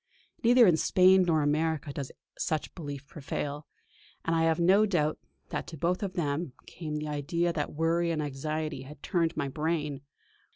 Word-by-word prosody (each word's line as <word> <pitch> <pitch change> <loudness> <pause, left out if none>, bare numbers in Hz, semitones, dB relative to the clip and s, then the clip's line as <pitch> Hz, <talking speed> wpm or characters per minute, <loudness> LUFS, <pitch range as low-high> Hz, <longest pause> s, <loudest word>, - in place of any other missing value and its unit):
Neither 240 +1 +7
in 175 -5 +5
Spain 185 +2 +5
nor 160 -3 +3
America 150 -1 0
does 140 -2 -5 0.2
such 155 -2 -1
a - - -15
belief 145 -5 -7
prevail; 145 0 -5 0.6
and 165 - +1
I 165 - +2
have 165 +1 +2
no 195 +5 +5
doubt 155 -6 0 0.3
that - - -4
to 160 - -8
both 175 +5 0
of 195 -3 -3
them 145 -3 -2
came 155 -3 -6
the 150 0 -3
idea 170 +4 -1
that 150 -2 -3
worry 165 +2 +1
and 165 -2 -1
anxiety 150 0 -3
had 140 +2 -12
turned 170 -3 0
my 145 -3 0
brain. 150 -1 -2
155 Hz, 175 wpm, -29 LUFS, 145-170 Hz, 0.6 s, Neither